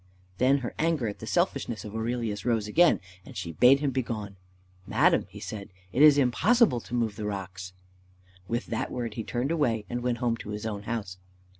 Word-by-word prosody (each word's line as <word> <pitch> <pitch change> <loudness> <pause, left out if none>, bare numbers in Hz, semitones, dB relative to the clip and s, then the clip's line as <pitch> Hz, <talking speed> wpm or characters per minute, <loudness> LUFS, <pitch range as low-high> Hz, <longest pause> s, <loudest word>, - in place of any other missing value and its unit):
Then 130 +2 +4
her - - -4
anger 160 -7 +1
at 105 - -5
the - - -8
selfishness 110 -5 -1
of 105 - -8
Aurelius 110 -2 -2
rose 115 -3 0
again, 170 +10 +4 0.2
and 125 - -11
she 90 -3 -4
bade 125 - +5
him 145 -2 +1
begone. 110 -6 -3 0.5
"Madam," - - +3
he - - -11
said, 100 -2 -7 0.2
"it 135 - +2
is 150 -1 +8
impossible 160 - +3
to 120 - -6
move 115 -4 -1
the 105 - -3
rocks." 95 -2 -6 0.7
With 120 +3 -2
that - - -3
word 115 -3 -4
he 115 - -4
turned 125 +6 -2
away, 120 -10 +1
and 120 0 -2
went 120 -1 0
home 120 -1 0
to 105 - -9
his 105 +1 -5
own 105 -2 -3
house. 100 -6 -4
115 Hz, 195 wpm, -28 LUFS, 105-125 Hz, 0.7 s, is